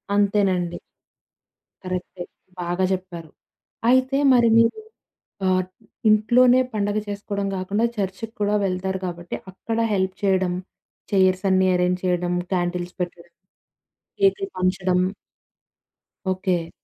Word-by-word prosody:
అంతేనండి. 195 -4 +1 1.0
కరెక్టే. 185 -1 -5 0.4
బాగా 175 +2 -1
చెప్పారు. 175 -3 -6 0.6
అయితే 260 +1 +3 0.2
మరి 240 -1 +5
మీరు 230 - +3 0.7
ఆహ్, 185 0 +2 0.4
ఇంట్లోనే 245 +4 +5
పండగ 205 0 0
చేసుకోవడం 200 0 -3
గాకుండా 200 +4 0
చర్చి‌కి 200 +3 -4
కూడా 205 +1 +2
వెళ్తారు 190 0 -2
కాబట్టి 175 -1 -5 0.2
అక్కడ 225 +4 -4 0.2
హెల్ప్ 190 -1 0
చేయడం, 190 -2 +2 0.6
చైర్స్ 190 -1 +3
అన్నీ 190 0 +4
ఎరేంజ్ 180 0 +1
చేయడం, 180 -1 0 0.2
క్యాండిల్స్ 175 0 -2
పెట్టడం, 175 -1 -6 0.9
కేకులు 390 0 +2
పంచడం 185 0 +1 1.3
ఓకే. 185 -3 -1
185 Hz, 100 wpm, -23 LUFS, 180-205 Hz, 1.3 s, మరి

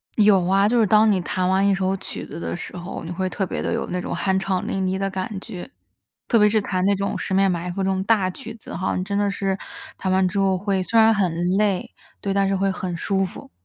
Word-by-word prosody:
有 205 -4 +5
啊， 195 +2 +4
就 240 +2 +2
是 220 - +4
当 215 +1 +5
你 185 -2 +1
弹 180 +1 -1
完 190 +1 +3
一 195 - +3
首 190 0 0
曲 - - -6
子 - - -8
的 - - -3
时 175 - -7
候， 175 +1 -6
你 165 - -6
会 185 +2 -2
特 195 - -2
别 - - -4
地 - - -2
有 - - -1
那 180 0 -1
种 - - -4
酣 190 -1 +1
畅 190 -1 -1
淋 190 -1 -1
漓 185 0 0
的 195 0 -1
感 185 -1 -3
觉， 180 -2 -8 0.6
特 230 - +4
别 210 0 +6
是 215 +1 +2
弹 185 -2 -1
那 200 - +3
种 200 +1 -2
《十 190 - -2
面 195 0 +4
埋 175 0 -2
伏》 - - -12
这 195 - +1
种 190 0 0
大 200 -4 +2
曲 225 +4 -9
子 220 - -11
哈， 185 +2 -1
你 185 - -1
真 200 +1 -2
的 205 0 +2
是 195 -1 -1 0.4
弹 190 -1 -1
完 190 0 +3
之 190 - -3
后 195 -1 +2
会 195 0 -1
虽 230 - +2
然 225 0 +6
很 185 -5 +1 0.2
累， 200 -3 +1 0.3
对， 200 - -2
但 195 0 +2
是 195 - +1
会 195 0 +1
很 180 -2 -4
舒 195 +2 0
服。 185 - -9
195 Hz, 290 characters per minute, -23 LUFS, 185-200 Hz, 0.6 s, 别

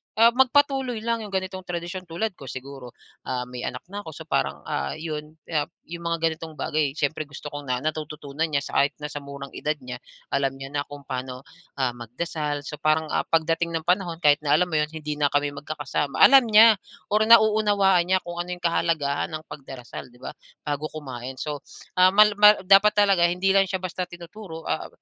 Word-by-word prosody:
ah, 230 +2 +6
magpatuloy 265 -2 +2
lang 230 -1 0
'yong 210 - -7
ganitong 190 0 -3
tradisyon, 175 +1 -5
tulad 195 +7 -2
ko 140 -6 -12
siguro, 130 -2 -9 0.3
ah, 125 -1 -2
may 125 0 -8
anak 125 - -5
na 205 - -3
ako, 165 - -9
so - - -8
parang, - - -1
ah, 70 -1 -2
'yon 155 -1 -6
yap 155 -1 -1 0.2
'yong 170 +1 -8
mga 170 0 -1
ganitong 160 -1 -9
bagay 150 -2 -1
siyempre 150 0 -2
gusto 140 - -11
kong 145 -2 -7
na 125 - +1
natututunan 155 +1 -3
niya, 150 - 0
sa - - -9
kahit 140 +1 0
na 150 - -7
sa 145 - -6
murang 140 0 -9
edad 150 +1 -2
niya, 125 -2 -8 0.3
alam 135 -1 +2
niya 135 0 -8
na 145 - 0
kung 145 0 -10
paano, 130 0 -5 0.3
ah, 130 -3 0
magdasal, 145 +5 -4
so 150 +1 -7
parang, 155 0 +1
ah, - - 0
pagdating 165 +1 +1
ng 160 - -2
panahon 180 0 +1
kahit 145 -1 +5
na 150 -1 +2
alam 180 +3 +1
mo 155 - +2
'yon 150 - +1
hindi 150 -1 -6
na 145 - +4
kami 145 0 0
magkakasama, 145 0 -4
alam 270 -3 +8
niya, 220 -1 +7 0.3
or 210 - +4
nauunawaan 210 -5 +5
niya 185 0 +2
kung 175 0 -7
ano 180 +1 -3
'yong 180 - -19
kahalagahan 160 -4 0
ng 155 - -7
pagdarasal 135 -3 -9
'di - - -20
ba, - - -5 0.3
bago 145 +1 -2
kumain 130 -3 -7
so, 145 +2 -4 0.4
um, 185 0 +7
mal 210 0 +7
mal 210 0 +9
dapat 195 +3 +6
talaga 195 -4 +4
hindi 180 +2 +1
lang 195 0 +4
siya 190 0 -3
basta 180 0 -3
tinuturo, 175 -1 -10
ah, - - -2
160 Hz, 205 wpm, -24 LUFS, 145-185 Hz, 0.4 s, mal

